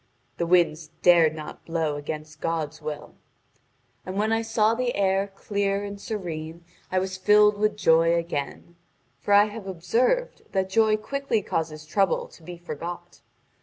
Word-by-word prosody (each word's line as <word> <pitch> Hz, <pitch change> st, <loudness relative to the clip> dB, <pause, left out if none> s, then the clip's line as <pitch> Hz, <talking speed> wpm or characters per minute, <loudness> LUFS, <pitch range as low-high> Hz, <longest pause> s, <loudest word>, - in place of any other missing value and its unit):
The 170 Hz, -, -1 dB
winds 165 Hz, -3 st, +3 dB, 0.2 s
dared 165 Hz, -3 st, +6 dB
not 155 Hz, -1 st, -9 dB
blow 165 Hz, -3 st, -1 dB
against 150 Hz, +1 st, -7 dB
God's 160 Hz, -1 st, -2 dB
will. 150 Hz, -1 st, -6 dB, 0.9 s
And 185 Hz, +1 st, -6 dB
when 215 Hz, +2 st, +1 dB
I 225 Hz, 0 st, +2 dB
saw 225 Hz, -1 st, +2 dB
the 245 Hz, +1 st, -1 dB
air 195 Hz, 0 st, +1 dB
clear 200 Hz, 0 st, -1 dB
and 200 Hz, 0 st, -7 dB
serene 170 Hz, -6 st, -5 dB, 0.3 s
I 185 Hz, -, 0 dB
was 185 Hz, 0 st, -1 dB
filled 210 Hz, +2 st, +5 dB
with 210 Hz, 0 st, +1 dB
joy 165 Hz, -3 st, +4 dB
again. 170 Hz, 0 st, -4 dB, 0.4 s
For -, -, -4 dB
I 205 Hz, +1 st, +7 dB
have 210 Hz, -1 st, -8 dB
observed 235 Hz, -, 0 dB
that 190 Hz, -1 st, 0 dB
joy 215 Hz, +1 st, +4 dB
quickly 235 Hz, -1 st, -2 dB
causes 155 Hz, -3 st, -3 dB
trouble 195 Hz, +3 st, +1 dB
to -, -, -17 dB
be 175 Hz, +2 st, -9 dB
forgot. 175 Hz, +1 st, -7 dB
185 Hz, 155 wpm, -25 LUFS, 165-210 Hz, 0.9 s, I